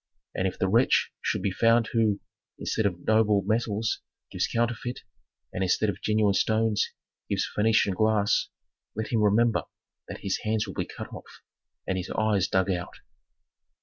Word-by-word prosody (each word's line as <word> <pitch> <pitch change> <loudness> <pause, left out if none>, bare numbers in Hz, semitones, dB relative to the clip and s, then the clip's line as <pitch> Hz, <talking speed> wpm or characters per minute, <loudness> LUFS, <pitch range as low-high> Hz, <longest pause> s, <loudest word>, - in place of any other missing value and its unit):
And 95 - 0
if 95 - -4
the 95 - +1
wretch 115 +7 +3
should - - -1
be 100 - +1
found 115 +3 +3
who, 110 -3 +2 0.4
instead 110 - 0
of 90 -3 -6
noble 110 -2 +3
metals, 110 0 0 0.3
gives - - 0
counterfeit, 120 +1 -2 0.5
and 95 - -3
instead 95 +3 +2
of 100 - -12
genuine 105 -2 +2
stones, 110 +1 +1 0.4
gives - - 0
Phœnician 105 -2 +3
glass, 110 +1 +2 0.5
let 110 0 -3
him 115 -3 +1
remember 110 +2 +3 0.5
that - - -8
his - - -1
hands 110 0 0
will 95 - -7
be - - -2
cut - - -9
off - - -12 0.4
and 95 0 -1
his 90 - -6
eyes 105 -3 +2
dug 95 +1 +1
out." 90 -1 -4
105 Hz, 160 wpm, -27 LUFS, 100-110 Hz, 0.5 s, wretch